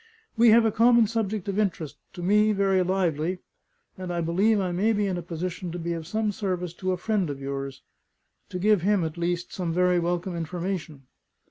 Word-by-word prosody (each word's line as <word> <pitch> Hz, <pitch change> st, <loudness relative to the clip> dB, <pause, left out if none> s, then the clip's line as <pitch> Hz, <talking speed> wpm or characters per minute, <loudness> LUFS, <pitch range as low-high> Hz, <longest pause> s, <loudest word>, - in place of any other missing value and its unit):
"We 235 Hz, 0 st, +6 dB
have 225 Hz, +1 st, +6 dB
a 220 Hz, -, +3 dB
common 235 Hz, +1 st, +5 dB
subject 215 Hz, -3 st, -2 dB
of 200 Hz, +1 st, -1 dB
interest, 165 Hz, -8 st, -1 dB, 0.2 s
to 175 Hz, -, -7 dB
me 210 Hz, +3 st, +4 dB
very 195 Hz, -2 st, +2 dB
lively; 180 Hz, -2 st, 0 dB, 0.6 s
and 185 Hz, -1 st, -4 dB
I 175 Hz, -, -1 dB
believe 190 Hz, +6 st, +2 dB
I 185 Hz, -2 st, -1 dB
may 205 Hz, +6 st, +2 dB
be 205 Hz, -1 st, +1 dB
in 190 Hz, -2 st, -1 dB
a 175 Hz, -, -3 dB
position 175 Hz, +1 st, -5 dB
to -, -, -4 dB
be 170 Hz, 0 st, -3 dB
of 165 Hz, -2 st, -6 dB
some 215 Hz, +2 st, 0 dB
service 180 Hz, -4 st, -3 dB
to 185 Hz, 0 st, -1 dB
a 185 Hz, -, -1 dB
friend 195 Hz, -2 st, 0 dB
of 140 Hz, -1 st, -5 dB
yours 135 Hz, 0 st, -5 dB, 0.7 s
to -, -, -4 dB
give 205 Hz, 0 st, +3 dB
him, 200 Hz, 0 st, +2 dB
at 160 Hz, -1 st, -3 dB
least, 175 Hz, 0 st, -2 dB
some 175 Hz, -3 st, -2 dB
very 180 Hz, +1 st, +3 dB
welcome 175 Hz, +1 st, -2 dB
information." 170 Hz, -3 st, -4 dB
180 Hz, 205 wpm, -26 LUFS, 170-205 Hz, 0.7 s, We